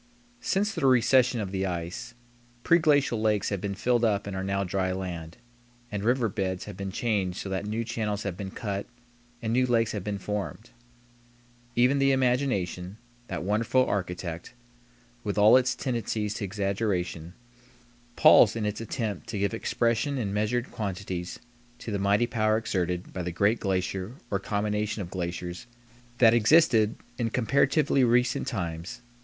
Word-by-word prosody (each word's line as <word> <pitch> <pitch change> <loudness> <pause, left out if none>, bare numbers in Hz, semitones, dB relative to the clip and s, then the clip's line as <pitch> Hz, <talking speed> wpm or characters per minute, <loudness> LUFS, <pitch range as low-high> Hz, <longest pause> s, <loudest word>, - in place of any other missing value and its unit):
Since 210 -3 0
the 135 - +1
recession 125 -1 +4
of 95 -2 -4
the 95 0 -1
ice, 90 +7 -5 0.5
preglacial 145 -8 +3
lakes 105 -2 +1
have 100 -3 -3
been 100 -1 -3
filled 120 +3 +1
up 105 -3 +1
and 100 -1 -5
are 95 - -3
now 100 0 0
dry 95 0 -1
land, 85 -3 -5 0.5
and 105 -1 -3
river 120 +1 +2
beds 95 -2 -3
have 105 - -8
been 95 0 -5
changed 100 -4 -1
so 100 - -5
that 95 +2 -3
new 110 +2 -2
channels 110 -3 -3
have 100 -4 -3
been 95 +1 -5
cut 100 0 -4 0.6
and 110 0 -1
new 125 +1 +3
lakes 115 -2 +2
have 105 -3 -4
been 105 0 -3
formed. 105 +3 -5 1.0
Even 125 +4 +4
the 135 0 +4
imagination, 125 -8 0 0.3
that 90 -3 -4
wonderful 115 +6 +2
architect, 90 0 -4 0.7
with 105 -1 -3
all 105 +3 +7
its 130 0 +3
tendencies 115 -5 -2
to 105 - -4
exaggeration, 95 -4 -2 0.8
palls 110 - +7
in 110 -2 -2
its 105 +1 -2
attempt 110 -4 -4
to 105 - -4
give 100 +2 0
expression 115 +4 0
in 105 -6 -2
measured 110 +4 -1
quantities 95 -4 -4 0.4
to 115 - -7
the 100 - -1
mighty 100 +4 +3
power 110 -2 +1
exerted 90 -5 -2
by 90 - -3
the 90 0 -3
great 100 +6 +2
glacier 95 +2 -2 0.2
or 100 - +1
combination 105 +1 -2
of 90 - -10
glaciers 90 +1 -5 0.5
that 115 -2 +6
existed 115 -2 +4 0.2
in 115 -1 0
comparatively 135 +3 +2
recent 125 +1 +2
times. 85 -1 -4
105 Hz, 160 wpm, -27 LUFS, 95-120 Hz, 1.0 s, all